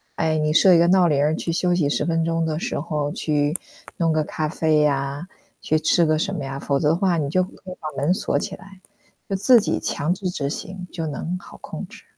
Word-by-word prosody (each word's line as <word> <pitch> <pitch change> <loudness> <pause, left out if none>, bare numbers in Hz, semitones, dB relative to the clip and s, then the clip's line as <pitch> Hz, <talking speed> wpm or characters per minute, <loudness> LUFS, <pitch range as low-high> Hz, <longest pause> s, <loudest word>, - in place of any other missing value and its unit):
哎， 160 -1 +1
你 155 0 +1
设 180 +3 +6
一 - - +6
个 170 - +5
闹 180 -1 +5
铃 145 -2 +2
儿， 155 +1 +2
去 165 - -3
休 175 +1 +1
息 160 -5 +1
10 - - 0
分 165 -1 +1
钟 165 0 0
的 155 -1 -2
时 - - -3
候， 150 -2 -2
去 150 0 0 0.4
弄 165 -2 +2
个 155 0 +1
咖 155 +1 -3
啡 155 -1 +2
啊， 140 +3 -1 0.3
去 155 - +1
吃 165 +2 +3
个 155 0 +2
什 195 +3 -1
么 140 - -4
呀， 135 0 -5
否 140 0 0
则 150 - +2
的 160 - +3
话 180 -1 +1
你 150 -3 -1
就 185 - +3
可 185 - -9 0.2
以 - - -7
把 155 -1 -6
门 165 +5 +3
锁 - - -1
起 195 - -3
来， 195 -1 -15 0.5
就 195 - -2
自 225 +6 +6
己 215 - -1
强 155 +5 -1
制 185 0 -3
执 145 -6 -3
行， 185 -1 -6
就 165 -2 -3
能 160 +4 -4
好 - - -13
控 - - -7
制。 - - -14
160 Hz, 260 characters per minute, -22 LUFS, 150-180 Hz, 0.5 s, 设